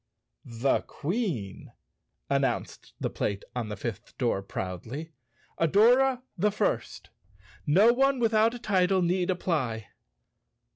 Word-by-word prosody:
"The 120 +3 +1
Queen," 155 - -3 0.5
announced - - -1
the - - -2
plate 100 -1 -2
on 120 -3 -3
the 105 - -5
fifth 110 -1 -6
door 115 -6 0
proudly, 105 - -6 0.2
" - - -31
Adora 245 - +4
the 205 +4 +2
First. - - -2 0.6
No 200 +10 +6
one 270 +2 +3
without 225 0 +3
a - - -5
title 190 -4 +2
need 180 +1 +1
apply." 130 - -1
175 Hz, 115 wpm, -28 LUFS, -, 0.6 s, No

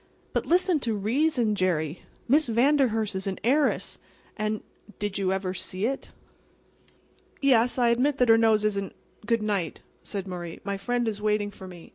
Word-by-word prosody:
"But, - - -1
listen 355 -1 +3
to 230 -5 -1
reason, 235 +2 +1
Jerry. 175 -5 -1 0.3
Miss 290 +4 +4
Vanderhurst 235 -3 +2
is 190 +1 -4
an 190 - -2
heiress, 280 +6 +1 0.4
and"— 215 0 -2 0.3
"Did 205 -1 -3
you 190 -1 +1
ever 190 -1 -1
see 185 +1 -3
it?" 270 +3 -3 1.3
"Yes, 250 -3 +3
I 240 -2 +3
admit 260 +4 +2
that 250 -3 +3
her 225 - +8
nose 220 -2 +3
isn't"— 200 -2 -1 0.3
"Good 230 -1 +1
night!" 200 -7 -2 0.2
said 200 -2 -5
Murray. 175 -2 -6
"My 200 0 -2
friend 240 +4 -1
is 210 -2 -3
waiting 210 -1 0
for 190 -1 -11
me. 175 -2 -12
215 Hz, 165 wpm, -26 LUFS, 195-245 Hz, 1.3 s, her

